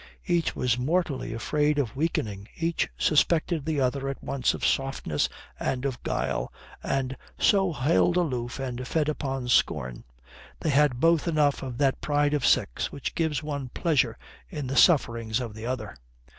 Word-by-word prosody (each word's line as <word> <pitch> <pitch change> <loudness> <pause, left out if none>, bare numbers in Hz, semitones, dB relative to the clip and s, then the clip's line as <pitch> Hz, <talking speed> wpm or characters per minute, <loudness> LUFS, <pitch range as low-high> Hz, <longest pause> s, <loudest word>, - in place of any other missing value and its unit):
Each 170 -3 +1
was 125 -1 +1
mortally 145 -2 0
afraid 150 +6 0
of 135 -6 -1
weakening, 110 -10 -2
each 165 0 0
suspected 160 0 +2
the 155 -2 0
other 135 +1 0
at 135 - -6
once 135 -2 0
of - - -3
softness 135 - 0 0.3
and 130 0 -2
of 130 -3 -3
guile - - -2 0.3
and 135 -1 -1 0.2
so 195 -4 +3
held 160 +5 +2
aloof 125 -9 -1
and 125 -2 -4
fed 155 +1 0
upon 135 -4 -3
scorn. 65 - +1 0.6
They 155 - +1
had 140 -3 +3
both 165 +1 +3
enough 150 -3 +2
of 130 -3 -5
that 135 -2 +1
pride 145 0 +1
of 145 -4 0
sex - - +1
which 140 - -4
gives 160 -3 -1
one 140 -4 -4
pleasure 140 -9 +1 0.3
in 150 -6 -5
the 130 +2 -3
sufferings 115 -9 +3
of 120 -4 -5
the 110 +2 -7
other. 130 0 -4
140 Hz, 160 wpm, -27 LUFS, 125-155 Hz, 0.6 s, so